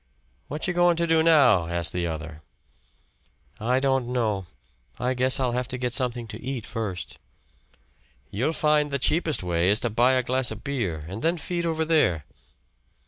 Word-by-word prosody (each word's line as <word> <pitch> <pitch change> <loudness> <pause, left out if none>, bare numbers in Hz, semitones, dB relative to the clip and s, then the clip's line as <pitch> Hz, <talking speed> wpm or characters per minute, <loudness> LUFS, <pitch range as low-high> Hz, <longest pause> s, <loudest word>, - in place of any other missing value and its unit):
"What 150 +5 -4
you 180 - 0
goin' 175 0 +4
to 170 - +1
do 165 -1 +3
now?" 135 - +5
asked 85 +1 0
the 90 -1 -1
other. 80 -1 -6 1.2
"I 125 +4 +1
don't 135 -2 +1
know. 110 -7 -1 0.5
I 125 +1 0
guess 130 +1 +3
I'll 130 -2 +1
have 125 0 -2
to 125 - -5
get 125 -1 -2
something 120 -3 0
to 105 +2 -8
eat 130 -3 -4
first." 110 -6 -5 1.1
"You'll 130 +11 -1
find 150 -1 +2
the 140 - -1
cheapest 155 - 0
way 90 0 +1
is 105 +2 +3
to 120 - -1
buy 120 +4 +3
a 130 -1 +2
glass 130 0 +2
of 110 -1 -7
beer 95 - -3
and 100 +6 -6
then 170 +5 +1
feed 170 +1 -3
over 160 -1 -1
there." 90 - +2
125 Hz, 180 wpm, -25 LUFS, 105-150 Hz, 1.2 s, now